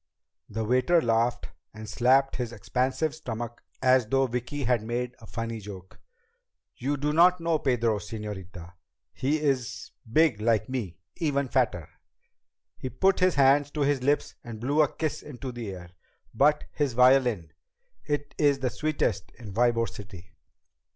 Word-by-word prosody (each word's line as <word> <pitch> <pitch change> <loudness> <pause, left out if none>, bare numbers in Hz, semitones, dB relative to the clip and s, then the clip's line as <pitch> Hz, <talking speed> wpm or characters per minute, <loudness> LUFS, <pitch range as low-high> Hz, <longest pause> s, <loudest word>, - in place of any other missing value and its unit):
The 110 +1 -3
waiter 130 +9 +3
laughed 115 -2 0 0.3
and 110 0 -8
slapped 130 +5 +3
his 120 -2 -3
expansive 130 +7 -1
stomach 120 -6 -6 0.2
as 130 -3 +4
though 135 +3 +2
Vicki 125 +4 -4
had 125 -2 +2
made 120 +2 -3
a 110 - -13
funny 115 0 -4
joke. 95 -3 -11 0.8
"You 140 +4 -2
do 150 +2 -1
not 180 +3 +5
know 165 -1 0
Pedro, 115 -5 +1
señorita. 100 -5 -8 0.4
He 145 +4 0
is 135 -5 -2 0.2
big 145 -6 +3
like 110 -1 +2
me. 115 -11 -4 0.2
Even 140 -4 0
fatter." 110 - 0 0.9
He 130 - -4
put 190 +10 +2
his 185 -1 +3
fingers 140 +1 +4
to 150 +1 -4
his 140 -2 +2
lips 145 +3 +1
and 115 -3 -8
blew 140 +6 +2
a 150 - +2
kiss 155 -2 -3
into 130 -2 -7
the 120 -3 -6
air. 90 -2 -9 0.4
"But 150 0 +3
his 145 -4 -1
violin 125 - +3 0.5
it 145 -1 -3
is 145 -2 +4
the 130 -2 -2
sweetest 135 -8 -1
in 110 -4 -9
Ybor 115 +1 +2
City." 95 -4 -11
125 Hz, 150 wpm, -27 LUFS, 110-145 Hz, 0.9 s, not